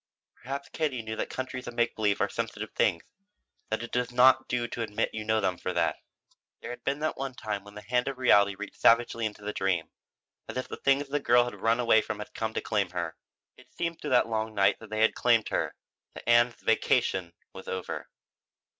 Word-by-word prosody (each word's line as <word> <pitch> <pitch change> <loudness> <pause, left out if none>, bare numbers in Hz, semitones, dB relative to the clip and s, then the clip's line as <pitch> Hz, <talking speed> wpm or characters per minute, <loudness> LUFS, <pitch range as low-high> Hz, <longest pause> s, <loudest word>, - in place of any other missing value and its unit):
Perhaps 140 +3 -6
Katie 140 -7 -2
knew 110 0 -4
that - - -3
countries 130 -1 -5
of 120 - -6
make 120 0 +1
believe 105 -2 +1
are - - +3
sensitive - - -4
things, 85 - +1 0.7
that 110 +1 -1
it 120 - -7
does 125 0 0
not 130 +1 +5
do 120 -1 -1
to 120 - -5
admit 105 -2 -1
you 110 - -4
know 110 0 +2
them 90 -4 -1
for 90 - -3
that. - - +1 0.6
There - - -7
had 125 - -9
been 140 +1 0
that 155 - 0
one 135 -1 -4
time 105 -4 -4
when 100 0 -14
the 105 - -9
hand 125 +4 0
of 135 -1 -3
reality 100 -6 +5
reached 105 +1 -9
savagely 115 -1 +4
into 105 -1 -10
the 105 0 -3
dream, 90 -4 -1 0.6
as - - -5
if 130 - -3
the - - -7
things 140 +1 +2
the 145 +1 0
girl 120 -2 +5
had 120 - -5
run 115 +1 +2
away 115 -2 +5
from 110 -1 -4
had 105 - -8
come 110 -1 -3
to - - 0
claim 100 -4 0
her. 85 -2 -4 0.4
It - - -19
seemed 170 -1 -3
through 150 - -4
that 125 -3 +4
long 110 -1 -2
night 100 -1 +3
that 110 - -12
they 110 0 -1
had 110 - +4
claimed 115 -3 +3
her, - - -1 0.4
that - - -10
Ann's 120 0 +5
"vacation" 95 -6 +1 0.2
was 95 - -10
over. 95 -1 -5
115 Hz, 225 wpm, -28 LUFS, 105-125 Hz, 0.7 s, not